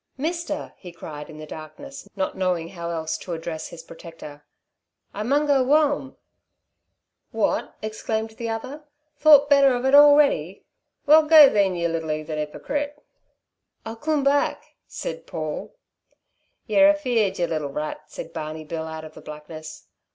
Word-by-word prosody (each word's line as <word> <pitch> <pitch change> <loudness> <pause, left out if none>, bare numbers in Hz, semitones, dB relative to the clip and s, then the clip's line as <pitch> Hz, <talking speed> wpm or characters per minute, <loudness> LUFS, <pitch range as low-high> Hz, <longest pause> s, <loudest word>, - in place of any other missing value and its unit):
"Mister," 320 +1 -4
he 180 - -11
cried 150 -3 -9
in 155 - -11
the 155 - -8
darkness, 275 - -10
not 190 -1 -2
knowing 180 -3 -1
how 170 -2 -6
else 160 -2 -3
to 175 - -6
address 160 -1 -5
his 165 -1 -11
protector. 165 -3 -12 0.7
"I 205 - -5
mun 280 +7 +1
go 280 -3 +3
whoam." 285 -1 +1 1.1
"Wot?" - - -1
exclaimed 220 0 -3
the 230 +1 -6
other. 255 +7 -5 0.4
"Thought 290 -2 +7
better 280 -2 +5
of 245 +1 -3
it 265 - +2
already? 285 - +5 0.4
Well, 310 +2 +7
go, 305 -3 +9
then, 195 -3 +2
yer 170 -1 0
little 165 -1 -3
'eathen 155 0 -4
'ippocrite!" 285 - -4 0.9
"I'll 225 0 -6
coom 300 +4 -1
back," 280 +1 +1 0.2
said - - -6
Paul. - - -5 0.9
"Yer 295 0 +5
afeared, 245 -10 +1
yer 175 - +1
little 155 -4 -3
rat," 150 +2 -5
said 165 - -9
Barney 155 -1 -6
Bill, 160 +1 -5
out 160 0 -7
of 155 - -12
the - - -13
blackness. 155 +1 -10
200 Hz, 150 wpm, -23 LUFS, -, 1.1 s, go